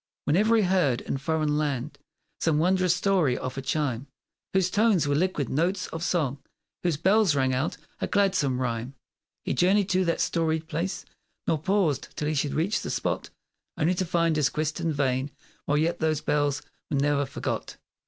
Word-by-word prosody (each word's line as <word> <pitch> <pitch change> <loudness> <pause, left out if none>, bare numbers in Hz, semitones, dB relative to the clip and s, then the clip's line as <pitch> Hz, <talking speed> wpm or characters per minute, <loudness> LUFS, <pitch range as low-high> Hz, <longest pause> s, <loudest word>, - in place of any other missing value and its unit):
Whene'er 210 +9 +3
he 220 - +4
heard, 180 -10 +2
in 135 - -3
foreign 155 0 0
land, 145 -2 -2 0.4
Some 160 -3 +2
wondrous 180 +2 +3
story 180 -9 +2
of 130 0 -5
a 135 - -3
chime 135 -2 -1 0.4
Whose 190 -1 +2
tones 205 -8 +3
were 145 - +1
liquid 150 -2 0
notes 180 +6 0
of 165 0 -5
song, 150 -7 0 0.4
Whose 170 -5 0
bells 190 0 +3
rang 130 -1 +2
out 130 +6 -1 0.2
a - - -1
gladsome 185 -11 +2
rhyme, 120 +1 -3 0.5
He - - 0
journeyed 195 +2 +3
to 185 0 +2
that 170 - 0
storied 160 -1 0
place, 175 +3 -3 0.4
Nor 160 - +1
paused 180 -3 +1
till 150 - -1
he 155 - 0
should 145 -1 -1
reach 175 +7 +1
the - - -5
spot, - - -2 0.5
Only 165 +4 +2
to 185 - -1
find 165 -2 +1
his 150 -3 +3
quest 155 +1 -2
in 165 -1 0
vain, 135 -2 0 0.4
While 145 - +1
yet 160 +3 +1
those 155 -2 +1
bells 145 -1 0 0.3
were 140 - 0
ne'er 140 0 +1
forgot. 135 - -4
155 Hz, 180 wpm, -26 LUFS, 140-180 Hz, 0.5 s, he